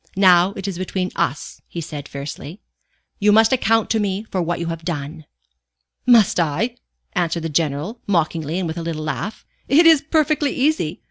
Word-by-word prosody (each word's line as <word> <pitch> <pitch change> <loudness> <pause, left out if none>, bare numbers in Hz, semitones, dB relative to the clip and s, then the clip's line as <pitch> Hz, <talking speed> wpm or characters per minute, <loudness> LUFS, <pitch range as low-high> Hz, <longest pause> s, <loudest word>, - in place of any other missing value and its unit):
"Now 185 -1 +5
it 195 0 -6
is 185 -3 -4
between 185 0 -2
us," 140 - -3
he 170 - -7
said, 150 -3 -7
fiercely. 145 +5 -7 0.6
"You 210 +1 +4
must 220 +3 +5
account 225 -3 +2
to 225 - +2
me 200 0 -1
for 195 -4 -3
what 175 0 -2
you 170 - -3
have 165 0 -5
done." 155 -1 -5 0.8
"Must 230 -7 +5
I?" 175 +10 0 0.4
answered 170 -1 -1
the 165 - -2
General, 155 - -1
mockingly 165 -3 0
and 185 -2 -1
with 160 +1 -4
a - - -4
little 165 -2 -4
laugh. 155 - -4 0.2
"It 305 +6 +5
is 320 -3 +7
perfectly 305 -2 +1
easy. 260 - 0
180 Hz, 180 wpm, -20 LUFS, 160-220 Hz, 0.8 s, is